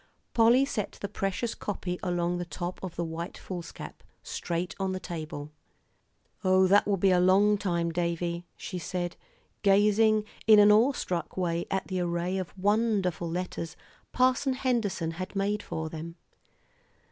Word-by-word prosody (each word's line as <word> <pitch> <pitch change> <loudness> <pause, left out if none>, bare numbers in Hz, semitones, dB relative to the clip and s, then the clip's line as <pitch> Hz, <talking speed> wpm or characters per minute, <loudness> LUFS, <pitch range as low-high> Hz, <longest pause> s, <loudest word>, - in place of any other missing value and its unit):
Polly 240 +3 +5
set 210 -7 -3
the 200 - -5
precious 195 +3 -2
copy 180 -3 -4
along 175 -1 0
the 175 - -3
top 175 +1 -5
of 185 -3 -6
the 170 - -2
white 165 +2 -5
foolscap, 175 -3 -8 0.2
straight 170 +1 -3
on 190 -1 -1
the 185 - -3
table. 155 -4 -6 0.9
"Oh, 185 0 +5
that 200 +2 +4
will 200 -1 +2
be 190 +1 +3
a 180 - +4
long 195 +3 +5
time, 170 -4 -1
Davie," 170 0 -2
she 180 - -5
said, 175 0 -3 0.5
gazing 210 +2 +4 0.2
in 215 -1 +9
an 210 0 +8
awe 230 +7 +5
struck 175 -8 -3
way 170 -2 -1
at 190 0 -1
the 185 -1 -3
array 175 +2 -1
of 185 - -5
wonderful 200 -4 +1
letters 175 -1 -4 0.4
Parson 260 +2 +2
Henderson 230 -10 0
had 185 +4 -6
made 205 +2 0
for 160 0 -4
them. 165 +1 -7
185 Hz, 155 wpm, -28 LUFS, 170-205 Hz, 0.9 s, in